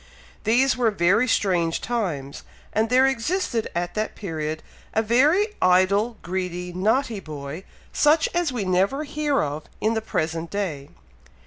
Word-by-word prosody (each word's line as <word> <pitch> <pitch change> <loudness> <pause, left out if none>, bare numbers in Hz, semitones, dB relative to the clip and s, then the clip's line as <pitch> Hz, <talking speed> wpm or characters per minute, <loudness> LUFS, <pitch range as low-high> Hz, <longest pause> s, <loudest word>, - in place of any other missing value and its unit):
These 250 +5 +3
were 245 -3 +2
very 200 +5 +2
strange 175 -7 +1
times, 170 - -3 0.3
and 220 +1 +1
there 255 +2 +5
existed 270 - -1
at 175 0 -2
that 215 0 -2
period, 155 -5 -4 0.3
a 220 - +3
very 295 - +3
idle, 195 +5 +3
greedy, 180 -1 -4
naughty 220 +4 +1
boy, 155 +1 -7 0.3
such 310 +2 +4
as 345 -4 +1
we 235 -6 -3
never 190 +10 +1
hear 295 -2 0
of 150 +1 -4
in 220 +1 +1
the 220 - -1
present 165 -5 -2
day. 165 -9 -3
205 Hz, 140 wpm, -24 LUFS, 175-250 Hz, 0.3 s, there